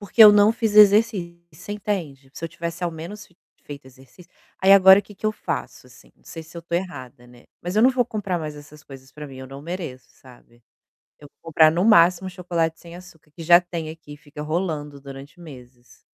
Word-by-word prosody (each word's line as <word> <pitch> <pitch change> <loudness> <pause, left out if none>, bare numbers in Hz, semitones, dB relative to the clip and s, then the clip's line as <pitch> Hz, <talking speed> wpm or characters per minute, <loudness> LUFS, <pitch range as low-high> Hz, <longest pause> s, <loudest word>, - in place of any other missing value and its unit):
Porque 205 +3 +4
eu 210 -1 +10
não 205 +1 +4
fiz 225 -2 -3
exercício, 205 -4 +4
você 195 +3 -9
entende? 165 -10 -5
Se 165 - -9
eu - - -4
tivesse 170 +1 -7
ao 175 - -2
menos 175 +6 -10
fe 175 - -30 0.3
feito 140 -2 -11
exercício 135 +8 -19 0.3
aí, 190 +1 +5
agora 190 0 +7
que 205 - -16
que 200 - -22
eu 215 - +2
faço, 215 - -6
assim? - - -20
Não - - -32
sei 165 - -10
se 160 +2 -16
eu - - -5
estou 170 0 -4
errada, 130 -9 -8
né, 120 0 -19 0.2
mas 180 +3 -5
eu 215 - +4
não 255 - +6
vou 255 -1 0
comprar 205 -6 -4
mais 155 -2 -7
essas 150 +1 -15
coisas 135 -2 -15
para 150 - -10
mim, 135 -2 -12
eu 130 - -10
não 135 +1 -11
mereço, 155 -8 -8
sabe? 120 -2 -21 0.6
Eu 145 - -14
vou - - -61
comprar 155 0 +5
no 170 +3 -1
máximo 185 -3 +4
chocolate 170 -3 -3
sem 170 0 -14
açúcar 175 -4 -16
que 165 +3 -12
já 175 +2 +6
tem 170 -3 -7
aqui 155 -2 -12
e - - -15
fica 150 0 -11
rolando 150 -3 -4
durante 140 +5 -12
meses. 125 -6 -15
165 Hz, 225 wpm, -22 LUFS, 145-190 Hz, 0.6 s, eu